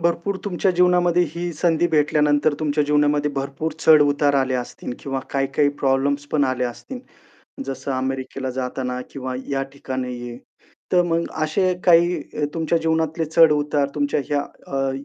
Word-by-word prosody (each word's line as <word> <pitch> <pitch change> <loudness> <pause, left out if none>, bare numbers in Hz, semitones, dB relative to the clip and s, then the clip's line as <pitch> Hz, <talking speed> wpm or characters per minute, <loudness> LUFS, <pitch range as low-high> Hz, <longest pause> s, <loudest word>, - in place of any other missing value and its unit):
भरपूर 170 +3 0
तुमच्या 195 -1 0
जीवनामध्ये 180 -1 +3
ही 175 0 -4
संधी 165 +1 +1
भेटल्यानंतर 150 -1 +2
तुमच्या 150 -1 +1
जीवनामध्ये 150 0 +2
भरपूर 140 +3 -3
चढ-उतार 145 -2 +4
आले 130 -1 0
असतील 125 0 -5
किंवा 135 -1 -3
काही-काही 140 +1 +1
प्रॉब्लेम्स 140 +1 +1
पण 145 -2 +3
आले 130 -1 -1
असतील. 125 - -6 0.7
जसं 135 +1 -5
अमेरिकेला 130 0 -3
जाताना 125 0 -3
किंवा 130 -2 -5
या 135 -1 -1
ठिकाणी 130 -2 -4 0.2
आहे. 120 - -8 0.6
तर 180 -1 +5
मग 170 -1 0 0.2
असे 185 +4 +1
काही 175 0 +5 0.3
अ, - - +4
तुमच्या 165 0 +1
जीवनातले 160 0 0
चढ-उतार 150 -3 +3
तुमच्या 145 0 0
ह्या 145 -1 +1 0.4
अ, 135 0 0
145 Hz, 145 wpm, -22 LUFS, 135-165 Hz, 0.7 s, तर